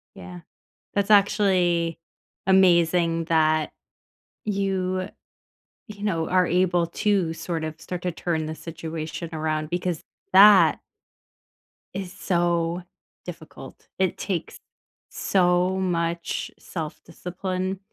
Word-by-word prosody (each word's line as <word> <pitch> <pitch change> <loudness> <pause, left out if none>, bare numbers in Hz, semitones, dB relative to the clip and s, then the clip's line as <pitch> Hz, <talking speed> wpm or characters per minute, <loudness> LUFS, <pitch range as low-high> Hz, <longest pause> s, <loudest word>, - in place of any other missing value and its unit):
Yeah, 180 -1 -10 0.5
that's 200 +1 0
actually 185 -5 +3 0.5
amazing 170 -3 +4
that 155 -2 +2 0.7
you 190 -2 -1 0.8
you 205 -1 -8
know, 165 -6 0
are 185 -1 +3
able 175 -1 +2
to 190 -1 0
sort 165 0 -4
of 155 0 -6
start 180 -1 -5
to 180 - -1
turn 160 -2 -2
the 155 - -4
situation 165 0 -6
around 155 -1 -2
because 175 -1 -2 0.3
that 200 +1 +8 1.2
is 190 -2 -5
so 170 -1 0 0.4
difficult, 160 -6 -11
it 190 -2 +1
takes 180 -5 -4 0.5
so 180 0 +2
much 170 -2 -2
self-discipline 185 +3 -5
175 Hz, 95 wpm, -24 LUFS, 165-190 Hz, 1.2 s, that